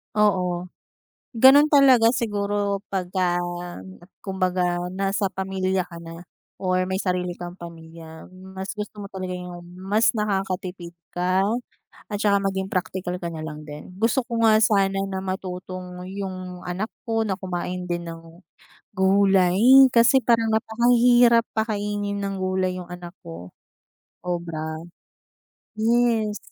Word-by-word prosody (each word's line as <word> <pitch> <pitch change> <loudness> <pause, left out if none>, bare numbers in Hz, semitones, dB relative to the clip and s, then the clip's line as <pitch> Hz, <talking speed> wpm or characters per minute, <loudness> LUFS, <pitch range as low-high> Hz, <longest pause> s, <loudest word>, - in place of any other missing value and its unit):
Oo. 180 -4 +1 0.7
Gano'n 270 +5 +7
talaga 260 -5 +6
siguro 205 -3 -1
pagka 180 -2 0 0.8
kumbaga 180 -2 -1
nasa 195 +1 0
pamilya 190 -1 -1
ka 170 -1 -10
na 165 +1 -10 0.3
or 185 -1 0
may 190 - -2
sarili 180 -2 -1
kang 175 +1 -9
pamilya. 165 -1 -11
Mas 190 +1 -8
gusto 210 0 -7
mo - - -7
talaga 185 -1 -5
yung 180 -1 -8 0.2
mas 200 +5 +2
nakakatipid 190 -4 -3 0.2
ka, 185 +2 +1 0.7
at 205 - -2
saka 200 -1 +2
maging 190 -1 -1
praktikal 185 -1 -3
ka 170 - -3
na 160 - -7
lang 155 -1 -7
din. 150 +4 -10
Gusto 230 +5 +1
ko 230 -2 -2
nga 220 -1 +6
sana 195 -3 +2
na 190 -1 -4
matutong 185 -1 -6
yung 185 -2 -6
anak 185 +5 -3 0.2
ko 225 -1 +1
na 200 -3 -2
kumain 180 -1 -4
din 175 -1 -3
ng 165 +2 -12 0.5
gulay, 190 -1 +3 0.3
kasi 245 +2 +5
parang 230 -1 +3
napakahirap 235 +1 +4
pakainin 205 -2 -2
ng 200 -1 -3
gulay 185 -1 -1
yung 180 - -9
anak 175 0 -9
ko, 85 +2 -10 0.7
obra. 160 -3 -4 1.0
Yes. 225 -1 +2
190 Hz, 125 wpm, -23 LUFS, 180-210 Hz, 1.0 s, Gano'n